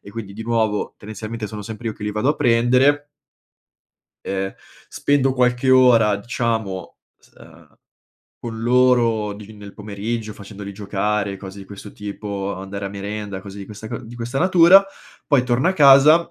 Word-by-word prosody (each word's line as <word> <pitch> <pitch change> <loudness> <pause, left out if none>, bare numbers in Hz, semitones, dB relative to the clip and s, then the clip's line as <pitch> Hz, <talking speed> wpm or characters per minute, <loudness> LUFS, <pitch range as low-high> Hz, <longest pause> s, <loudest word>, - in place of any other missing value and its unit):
e 100 - -13
quindi, 100 -2 -7
di 110 +3 -7
nuovo, 110 -2 -1
tendenzialmente 110 +1 -7
sono 105 +1 -7
sempre 110 +2 -8
io - - -3
che - - -13
li 105 - -2
vado 105 +6 0
a 150 - -2
prendere 130 +5 +3 1.2
ehm, 95 0 -3 0.3
spendo 135 -2 +1
qualche 125 0 +1
ora, 120 -5 +5
diciamo, 110 -4 -3 0.2
s - - -26
uhm, - - -18 0.7
con 115 -1 -5
loro 120 -3 +3
di 105 +1 -11
nel 100 -1 -11
pomeriggio, 105 +2 -5
facendoli 100 0 -9
giocare, 100 0 -2
cose 95 0 -10
di - - -10
questo 100 +1 -11
tipo, 100 -1 -5
andare 95 +1 -7
a - - -2
merenda, 100 0 -6
cose 100 0 -11
di 100 - -7
questa 105 +2 -10
c - - -5
di 115 +1 -11
questa 120 +3 -4
natura; 185 +3 +6 0.4
poi 140 -4 +3
torno 125 +6 +1
a - - +2
casa, 150 +1 +6
110 Hz, 165 wpm, -21 LUFS, 100-125 Hz, 1.2 s, natura